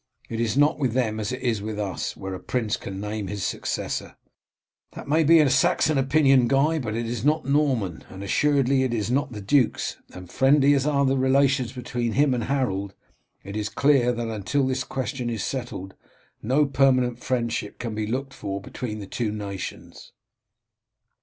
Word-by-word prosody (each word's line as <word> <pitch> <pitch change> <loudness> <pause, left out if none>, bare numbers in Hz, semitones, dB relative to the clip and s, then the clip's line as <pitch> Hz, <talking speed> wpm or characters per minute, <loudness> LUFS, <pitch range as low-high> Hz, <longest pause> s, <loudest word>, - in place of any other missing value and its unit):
It 115 - -4
is 115 0 0
not 145 +2 +3
with 130 -5 0
them 110 -4 0
as 105 +1 -2
it 130 0 -5
is 115 -5 0
with 105 0 -5
us, 100 -3 -3
where 95 0 -5
a 95 - -5
prince 115 -4 -1
can 95 0 -7
name 105 0 -4
his 100 0 -4
successor." - - -3 0.8
"That - - -9
may 155 +3 +3
be 155 -1 +6
Saxon 135 +2 +3
opinion, 135 -2 +4
Guy, 145 +5 +2
but 110 -5 -3
it 115 +1 -2
is 115 -1 -4
not 150 +1 +2
Norman, 135 - 0
and 95 +1 -8
assuredly 135 +4 +2
it 130 -2 0
is 110 +1 -2
not 140 +1 0
the 105 -3 -7
duke's; 125 +4 +1
and 90 0 -10
friendly 140 +7 +4
as 140 0 +1
are 140 -2 +2
the 135 0 +2
relations 130 -2 +2
between 120 -2 -3
him 140 0 +3
and 120 -3 -1
Harold, 100 -8 -1 0.5
it 100 +1 -8
is 105 0 -2
clear 135 -1 +3
that 120 -1 -3
until 115 +6 -1
this 130 0 -1
question 130 -1 -3
is 110 -5 -3
settled 120 -6 -5 0.5
no 135 +6 +2
permanent 130 -3 +2
friendship 115 -4 -2
can 115 -2 -4
be 105 0 -3
looked 135 +4 -3
for 100 -6 -4
between 110 +2 -6
the 105 - -7
two 110 +2 -2
nations." 100 -3 -7
125 Hz, 185 wpm, -25 LUFS, 110-135 Hz, 0.8 s, be